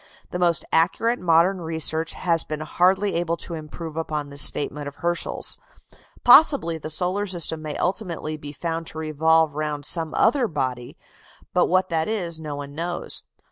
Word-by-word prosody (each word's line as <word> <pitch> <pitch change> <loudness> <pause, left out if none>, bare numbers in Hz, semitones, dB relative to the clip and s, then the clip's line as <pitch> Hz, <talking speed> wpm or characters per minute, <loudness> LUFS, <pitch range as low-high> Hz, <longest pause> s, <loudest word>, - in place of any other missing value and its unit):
The 180 - -4
most 175 -2 +2
accurate 225 +9 +2
modern 175 +2 +2
research 160 0 0
has 170 -2 +2
been 155 0 -5
hardly 190 +5 +1
able 170 0 -1
to 170 - -6
improve 155 0 -8
upon 155 -3 -3
this 140 0 +3
statement 145 +1 +3
of 140 - -8
Herschel's. 175 0 -1 0.6
Possibly 245 - +6
the 155 - -6
solar 185 +6 0
system 170 -3 -3
may 155 -1 -5
ultimately 175 -5 -2
be 145 -1 -9
found 165 +2 -4
to - - -8
revolve 160 0 +2
round 150 -1 -4
some 165 -1 -1
other 245 +1 +3
body, 130 - -4 0.6
but 180 - +3
what 185 +1 +1
that 160 -2 -1
is 175 -7 -2
no 150 -2 -6
one 140 0 -8
knows. 175 +3 -1
165 Hz, 165 wpm, -23 LUFS, 155-180 Hz, 0.6 s, Possibly